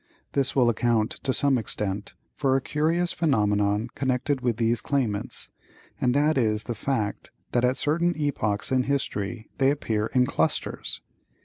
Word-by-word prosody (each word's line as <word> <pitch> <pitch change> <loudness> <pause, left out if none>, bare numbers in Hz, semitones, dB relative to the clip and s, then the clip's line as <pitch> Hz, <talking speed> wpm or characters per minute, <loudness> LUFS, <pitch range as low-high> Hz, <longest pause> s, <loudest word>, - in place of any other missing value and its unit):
This 135 -1 0
will 125 -3 +4
account, 115 -1 +2
to 135 - 0
some 135 -1 +2
extent, 105 -1 -4 0.2
for 135 -2 +1
a - - +4
curious 165 +5 0
phenomenon 105 -8 +2
connected 130 +1 0
with 120 -3 0
these 115 0 +1
claimants, 120 -8 -2 0.5
and 125 0 +2
that 150 0 +3
is 110 -2 +2
the 120 - -3
fact 110 -3 -2 0.2
that 120 - +2
at 125 +1 +2
certain 170 +3 +1
epochs 120 -9 -1
in 130 -1 +2
history 115 -5 -2
they 135 -1 +5
appear 110 -7 0
in 125 -1 +3
clusters. - - -1
125 Hz, 150 wpm, -26 LUFS, 110-140 Hz, 0.5 s, they